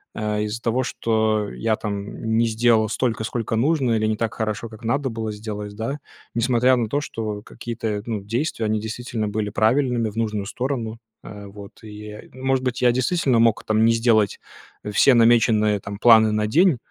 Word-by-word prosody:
э, 105 -1 -1
из-за 110 +3 -5
того, 120 +3 +1
что 110 -3 0
я, 110 -1 0
там, 105 +2 -4
не 115 - +3
сделал 110 -1 +2
столько, 115 -2 -1
сколько 115 -1 -3
нужно, 135 +1 +1
или 110 0 0
не 110 -1 -1
так 115 -1 -2
хорошо, 110 +1 -3
как 110 +1 -13
надо 135 +4 0
было 110 -1 -4
сделать, 105 -1 -6
да. 125 +7 -4 0.4
Несмотря 125 +2 +3
на 115 -3 -1
то, 145 - 0
что 110 -6 -5
какие-то, 115 -3 -5
ну, 110 -3 -3
действия, 115 +2 -2
они 110 0 0
действительно 110 0 -4
были 105 0 -2
правильными, 120 +1 +1
в 105 - -13
нужную 105 -3 -1
сторону, 115 -2 -3 0.2
э, 105 -1 -10
вот. 100 +2 -13
И, 105 0 -10
э, 105 - -11
может 130 0 -1
быть, 125 -1 -2
я 125 - +5
действительно 130 0 +1
мог, 115 -1 +3
там, 110 +1 +2
не 115 - +5
сделать, 115 -3 +2 0.4
э, 105 - -5
все 130 +6 +5
намеченные 115 -3 +4 0.2
планы, 110 -2 +7
там, 105 - -1
на 105 0 0
день, 165 - +4
110 Hz, 190 wpm, -22 LUFS, 105-120 Hz, 0.4 s, планы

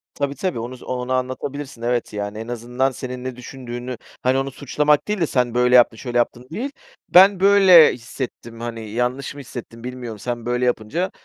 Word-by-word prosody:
Tabii, 140 0 -2
tabii 185 -11 -2
onu 120 +3 -5
z - - -15
onu 125 0 -3
anlatabilirsin. 130 0 -4
Evet, 120 -1 -1
yani 105 0 -4
en 115 +1 -6
azından 120 +3 -1
senin 125 -1 -6
ne 130 -1 -5
düşündüğünü, 125 -1 -7 0.3
hani, 130 +1 +3
onu 135 0 -1
suçlamak 150 +2 +1
değil 210 -1 -1
de 165 - +1
"Sen 125 -4 0
böyle 125 +1 +4
yaptın, 120 -2 +5
şöyle 120 -2 -3
yaptın." 120 +1 -1
değil 255 - -3 0.4
"Ben 190 +1 +7
böyle 190 -4 +7
hissettim. 120 -1 -7
Hani, 115 -2 -6
yanlış 125 +5 -2
mı - - -9
hissettim? 120 -2 -9
Bilmiyorum. 125 -4 -6
Sen 120 +1 -4
böyle 125 +1 0
yapınca, 125 - -1
125 Hz, 185 wpm, -21 LUFS, 120-140 Hz, 0.4 s, Ben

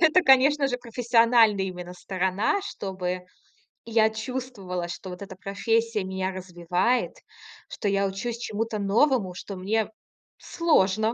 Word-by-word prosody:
это, 335 +2 +5
конечно 275 0 +5
же, 250 - -1
профессиональная 230 -3 +3
именно 180 -1 -6
сторона. 190 - -1
Чтобы 185 - -4 0.6
я 225 -1 +3
чувствовала, 220 -6 -5
что 175 +2 -7
вот 180 +1 -8
эта 195 -1 -8
профессия 220 +2 -1
меня 190 0 -2
развивает, 180 +5 -1 0.6
что 205 - -3
я 200 0 +1
учусь 215 +5 -4
чему-то 225 -1 -3
новому, 205 0 +2
что 195 +2 -7
мне 210 +4 0 0.5
сложно 220 - +2
210 Hz, 125 wpm, -26 LUFS, 190-235 Hz, 0.6 s, это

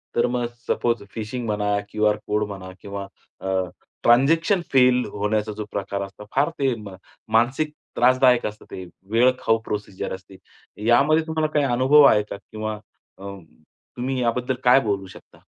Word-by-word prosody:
तर 120 - +3
मग 120 -1 -1 0.2
suppose 120 -3 0
fishing 115 +2 -5
म्हणा, 105 -1 0
क्यूआर 105 0 +2
कोड 105 0 +1
म्हणा 95 -2 -8
किंवा 100 -1 -6 0.3
अ, - - -5 0.6
ट्रान्झॅक्शन 165 - +4
फेल 125 -1 +5
होण्याचा 105 +1 -1
जो 105 - -4
प्रकार 100 0 -3
असतो. 100 +2 -10
फार 145 +4 +3
ते 135 -2 +2
म 100 -3 -9 0.4
मानसिक 130 +7 +2 0.2
त्रासदायक 125 0 +4
असतं. 105 0 -6
ते 95 - -7 0.3
वेळखाऊ 120 -1 +3
प्रोसिजर 100 -2 -4
असते. 95 0 -15 0.5
यामध्ये 150 +7 +4
तुम्हाला 160 -1 0
काही 145 -2 +2
अनुभव 130 +4 +5
आहे 105 -6 +6
का - - -5
किंवा 110 +1 -6 0.4
अं, 100 -2 -9 0.5
तुम्ही 130 +1 -2
याबद्दल 125 +2 0
काय 125 +2 +6
बोलू 100 -3 -2
शकता? 95 - -16
115 Hz, 150 wpm, -23 LUFS, 105-130 Hz, 0.6 s, आहे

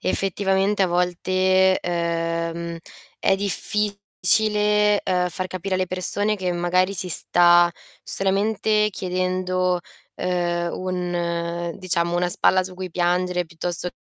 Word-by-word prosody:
effettivamente, 195 +1 +1
a - - +3
volte, 185 +2 +2
ehm, 170 0 -2 0.4
è 195 - +2
difficile, 210 +1 +1
ehm, 180 -1 0
far 185 +2 -4
capire 185 +1 -4
alle 185 0 0
persone 205 +4 +1
che 185 -2 -2
magari 180 +2 +1
si 185 -1 +3
sta 175 +1 +4 0.3
solamente 210 +2 +1
chiedendo, 185 -1 -1 0.4
ehm, 175 -1 -1
un 175 -2 -3
diciamo, 175 -2 -1
una 175 0 +1
spalla 185 +1 +3
su 185 - -7
cui 185 -1 -6
piangere 180 +1 0
piuttosto 175 +2 -2
185 Hz, 110 wpm, -22 LUFS, 175-190 Hz, 0.4 s, sta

